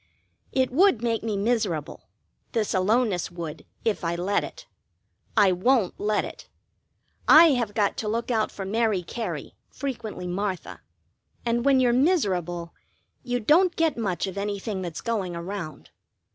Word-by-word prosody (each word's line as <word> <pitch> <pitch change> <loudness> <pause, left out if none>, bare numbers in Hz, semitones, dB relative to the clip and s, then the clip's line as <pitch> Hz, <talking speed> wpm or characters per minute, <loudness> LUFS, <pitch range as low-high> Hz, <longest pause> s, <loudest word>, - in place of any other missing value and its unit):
It 260 -1 +1
would 295 - +4
make 230 -2 0
me 215 -2 -2
miserable 200 -8 -1 0.4
this 220 -3 0
aloneness 200 0 +1
would, 165 -3 -7 0.2
if 220 -4 0
I 170 0 0
let 185 +4 0
it. - - -9 0.7
I 200 -3 +6
won't 195 +2 +2
let 210 0 +1
it. - - -10 0.8
I 320 +1 +9
have 235 -6 -1
got 205 -2 +1
to 215 - -3
look 230 +3 -1
out 220 -2 +1
for 195 - -6
Mary 215 -2 +1
Cary, 175 - -5 0.2
frequently 235 -8 -5
Martha, 185 +1 -3 0.6
and 235 0 +1
when 275 -2 +5
you're 245 -2 +3
miserable 185 - +1 0.5
you 245 -1 -2
don't 340 - +4
get 325 -2 +2
much 200 -6 -1
of 195 0 -5
anything 200 0 -3
that's 170 -4 -5
going 200 -7 -2
around. 170 -2 -6
210 Hz, 145 wpm, -25 LUFS, 185-240 Hz, 0.8 s, I